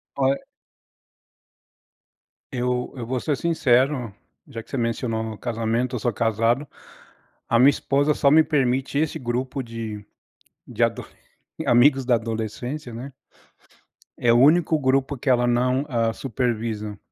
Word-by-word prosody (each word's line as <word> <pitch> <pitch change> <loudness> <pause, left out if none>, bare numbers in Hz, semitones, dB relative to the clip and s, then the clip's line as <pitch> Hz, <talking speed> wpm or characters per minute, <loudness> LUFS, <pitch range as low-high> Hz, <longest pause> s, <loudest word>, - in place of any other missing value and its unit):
Olha 135 0 +1 2.1
eu 125 0 -2
eu 120 - -5
vou 125 +2 -2
ser 145 -3 -1
sincero, 130 -7 +1 0.3
já 115 - -7
que - - -22
você - - -5
mencionou 115 -1 -1
no 110 -1 -6
casamento, 120 +2 -2
eu - - -2
sou 120 +3 0
casado. 115 +5 0 0.8
A 115 - +3
minha 130 +3 +7
esposa 145 +1 +1
só 140 - +3
me 160 +1 +7
permite 135 -2 0
esse 160 +1 -1
grupo 130 +2 -3
de 115 -3 -7 0.8
adoles - - 0 0.5
de - - -4
amigos 135 +2 +4
da 125 -1 +4
adolescência, 115 +4 -4
né, 125 +5 -7 1.1
é 120 - +3
o 120 - +4
único 160 +4 +4
grupo 135 +1 +1
que 130 +2 -1
ela 120 -1 +3
não 125 +3 +1
hã 115 -4 0
supervisa, 110 -4 -3
125 Hz, 135 wpm, -23 LUFS, 115-135 Hz, 2.1 s, minha